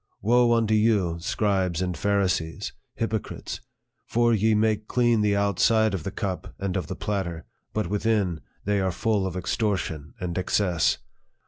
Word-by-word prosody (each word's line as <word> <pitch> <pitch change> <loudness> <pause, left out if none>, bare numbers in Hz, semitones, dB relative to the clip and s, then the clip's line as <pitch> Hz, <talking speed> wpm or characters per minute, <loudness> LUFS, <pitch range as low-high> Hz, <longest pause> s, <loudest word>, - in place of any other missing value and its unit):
Woe 120 +3 +4
unto 115 -2 +2
you, 105 -6 +2
scribes 95 -1 0
and 90 -1 -1
Pharisees, 90 -3 0 0.2
hypo 115 -1 0
crites! - - -7 0.5
for 120 0 +3
ye 110 +1 +3
make 110 0 +1
clean 120 -3 +3
the 105 -1 +2
outside 100 +2 +3
of 95 - -2
the 90 - -4
cup 95 -1 -4
and 95 -1 -2
of 90 -6 -2
the - - -4
platter; 90 -6 -3 0.3
but 110 - -1
within, 100 -3 0 0.2
they 100 0 +2
are 95 -1 +1
full 100 +1 0
of 95 -1 -4
extortion 90 -6 -2
and 90 0 -2
excess. 90 -4 +2
100 Hz, 155 wpm, -26 LUFS, 90-110 Hz, 0.5 s, Woe